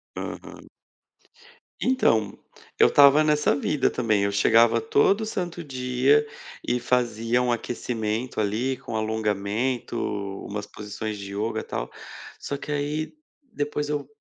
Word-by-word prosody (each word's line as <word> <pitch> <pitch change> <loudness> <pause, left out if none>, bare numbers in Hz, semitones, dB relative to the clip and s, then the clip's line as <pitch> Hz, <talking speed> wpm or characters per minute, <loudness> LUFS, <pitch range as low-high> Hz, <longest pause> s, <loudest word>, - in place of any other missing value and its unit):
Aham. - - -7 1.1
Então, 110 - +2 0.4
eu - - +8
estava 145 +2 +7
nessa 150 -1 +2
vida 145 0 +1
também, 110 -4 +1
eu 100 - +1
chegava 115 +3 +4
todo 200 - +2
santo 175 -5 -4
dia 130 +1 +2 0.4
e 125 0 +1
fazia 120 -1 +1
um 125 -1 +1
aquecimento 115 0 -3
ali 115 +6 0
com 115 - -7
alongamento, 110 +3 -1 0.5
umas 105 0 -5
posições 105 +1 -6
de 100 0 -8
ioga 110 +2 -2
tal, - - -5 0.5
só 140 - -4
que 150 - -7
aí 150 +2 -2 0.4
depois 150 -3 -2
eu 145 -2 -2
125 Hz, 125 wpm, -25 LUFS, 110-145 Hz, 1.1 s, eu